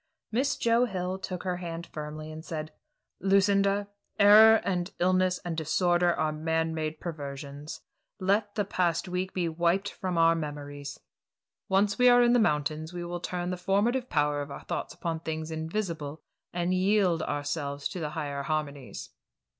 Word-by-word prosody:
Miss 260 Hz, +5 st, +1 dB
Joe 235 Hz, +1 st, +3 dB
Hill 185 Hz, -3 st, -3 dB
took 185 Hz, -1 st, -5 dB
her 180 Hz, -2 st, -1 dB
hand 170 Hz, -1 st, -5 dB
firmly 155 Hz, 0 st, -7 dB
and 155 Hz, 0 st, -8 dB
said: 155 Hz, -2 st, -5 dB, 0.5 s
"Lucinda, 200 Hz, +1 st, +3 dB, 0.3 s
error 215 Hz, +2 st, +9 dB
and 180 Hz, -1 st, -1 dB
illness 185 Hz, 0 st, +2 dB
and 170 Hz, -2 st, -2 dB
disorder 175 Hz, +2 st, +2 dB
are 155 Hz, -2 st, 0 dB
man 160 Hz, +1 st, -1 dB
made 155 Hz, -1 st, -3 dB
perversions. 145 Hz, -2 st, -7 dB, 0.4 s
Let 205 Hz, +2 st, +1 dB
the 205 Hz, -2 st, 0 dB
past 175 Hz, -2 st, 0 dB
week 180 Hz, +1 st, -2 dB
be 180 Hz, -2 st, -1 dB
wiped 175 Hz, +5 st, +1 dB
from 185 Hz, -2 st, -3 dB
our 165 Hz, 0 st, +6 dB
memories. 145 Hz, -3 st, -6 dB, 0.7 s
Once 200 Hz, +4 st, +2 dB
we 250 Hz, 0 st, +7 dB
are 245 Hz, 0 st, +7 dB
in 240 Hz, 0 st, +4 dB
the 245 Hz, -, +5 dB
mountains 155 Hz, -3 st, 0 dB
we 175 Hz, -1 st, -5 dB
will 175 Hz, 0 st, -4 dB
turn 175 Hz, 0 st, -3 dB
the 180 Hz, -, -3 dB
formative 220 Hz, +8 st, +1 dB
power 145 Hz, -2 st, +1 dB
of 145 Hz, -, -6 dB
our 140 Hz, -, -8 dB
thoughts -, -, -4 dB
upon 165 Hz, -1 st, -3 dB
things 160 Hz, 0 st, -4 dB
invisible, 160 Hz, -2 st, -4 dB, 0.3 s
and 175 Hz, +1 st, 0 dB
yield 185 Hz, -3 st, +2 dB
ourselves 145 Hz, -1 st, -2 dB
to 185 Hz, -, -6 dB
the 155 Hz, -3 st, -2 dB
higher 145 Hz, -2 st, -3 dB
harmonies." 145 Hz, -2 st, -4 dB
175 Hz, 160 wpm, -28 LUFS, 155-190 Hz, 0.7 s, error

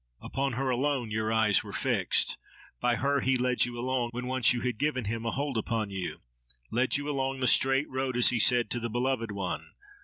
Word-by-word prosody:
Upon 135 Hz, -1 st, -2 dB
her 130 Hz, +2 st, -1 dB
alone 130 Hz, -2 st, -1 dB
your 110 Hz, 0 st, -1 dB
eyes 110 Hz, -2 st, +3 dB
were -, -, -9 dB
fixed; -, -, 0 dB, 0.4 s
by 120 Hz, -1 st, +2 dB
her 140 Hz, +3 st, +1 dB
he 130 Hz, 0 st, +2 dB
led 125 Hz, -1 st, +2 dB
you 120 Hz, -1 st, -6 dB
along, 125 Hz, 0 st, -1 dB
when 125 Hz, +1 st, -4 dB
once 130 Hz, -2 st, +3 dB
you 120 Hz, -1 st, -1 dB
had 125 Hz, -3 st, -2 dB
given 145 Hz, -5 st, 0 dB
him 115 Hz, +2 st, -3 dB
a -, -, 0 dB
hold 140 Hz, -3 st, -2 dB
upon 110 Hz, -2 st, -2 dB
you—led 60 Hz, -, -3 dB
you 145 Hz, 0 st, -5 dB
along 135 Hz, -2 st, -1 dB
the 130 Hz, -, 0 dB
straight 135 Hz, +3 st, +4 dB
road, 130 Hz, -1 st, -2 dB
as 125 Hz, -, +5 dB
he 120 Hz, -, 0 dB
said, 120 Hz, +2 st, +3 dB
to 120 Hz, -, 0 dB
the 120 Hz, 0 st, -3 dB
beloved 120 Hz, -1 st, -1 dB
one. 95 Hz, -3 st, -4 dB
125 Hz, 210 wpm, -29 LUFS, 110-130 Hz, 0.4 s, as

